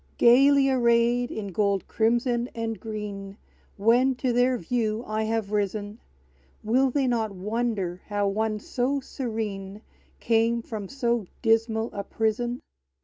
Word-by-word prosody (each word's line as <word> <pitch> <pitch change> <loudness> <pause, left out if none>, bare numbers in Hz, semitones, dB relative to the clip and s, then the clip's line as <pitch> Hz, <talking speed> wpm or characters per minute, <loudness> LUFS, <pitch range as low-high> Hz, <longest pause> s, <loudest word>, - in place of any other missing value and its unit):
Gayly 275 +3 +6
arrayed 240 -1 +3
in 205 -2 -5
gold, 200 0 0
crimson, 240 +2 +1
and 225 -1 -3
green, 205 -2 -6 0.4
When 245 +6 +3
to 250 -1 -1
their 250 +1 +3
view 225 +2 -1
I 215 0 -1
have 220 -2 -2
risen; 205 +1 -2 0.6
Will 255 +5 +3
they 275 +1 0
not 230 -3 0
wonder 200 -3 -2
how 205 -1 0
one 215 +2 0
so 255 +6 -1
serene 215 -6 -5 0.4
Came 230 +1 +2
from 215 -4 -6
so 235 -6 -1 0.2
dismal 225 0 +2
a 200 - -4
prison? 225 +4 -1
225 Hz, 130 wpm, -26 LUFS, 210-240 Hz, 0.6 s, Gayly